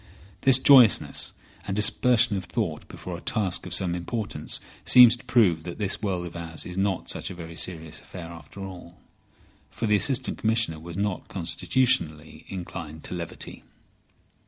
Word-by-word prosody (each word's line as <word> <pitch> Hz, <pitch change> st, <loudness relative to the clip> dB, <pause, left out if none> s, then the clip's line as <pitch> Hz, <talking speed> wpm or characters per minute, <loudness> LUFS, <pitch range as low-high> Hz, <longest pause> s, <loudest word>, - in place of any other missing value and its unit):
This 135 Hz, -1 st, +7 dB
joyousness 120 Hz, -, +5 dB, 0.4 s
and 95 Hz, -, -2 dB
dispersion 115 Hz, +1 st, +3 dB
of 95 Hz, -, -4 dB
thought 90 Hz, -11 st, -3 dB
before 90 Hz, -, -8 dB
a 85 Hz, -, -9 dB
task 100 Hz, -5 st, -1 dB
of 90 Hz, -, -6 dB
some 90 Hz, -3 st, +1 dB
importance 100 Hz, +5 st, -3 dB, 0.2 s
seems 125 Hz, -2 st, +8 dB
to 120 Hz, -, -16 dB
prove 95 Hz, -10 st, +3 dB
that 85 Hz, +1 st, -8 dB
this 100 Hz, -1 st, -2 dB
world 95 Hz, -4 st, -2 dB
of 85 Hz, -, -9 dB
ours 80 Hz, -1 st, -4 dB
is 90 Hz, -, -7 dB
not 95 Hz, -1 st, -1 dB
such -, -, -2 dB
a 95 Hz, -, -8 dB
very 85 Hz, -1 st, -9 dB
serious 80 Hz, -3 st, -3 dB
affair 85 Hz, -3 st, -10 dB
after 85 Hz, +3 st, -12 dB
all. 90 Hz, -3 st, -10 dB, 0.7 s
For 115 Hz, -, -5 dB
the 105 Hz, -1 st, +3 dB
Assistant 130 Hz, +3 st, 0 dB
Commissioner 110 Hz, -8 st, 0 dB
was 85 Hz, +2 st, -9 dB
not 100 Hz, -2 st, -2 dB
constitutionally 85 Hz, -, 0 dB
inclined 80 Hz, -4 st, -7 dB
to -, -, -6 dB
levity. 85 Hz, -2 st, -7 dB
95 Hz, 160 wpm, -25 LUFS, 85-110 Hz, 0.7 s, seems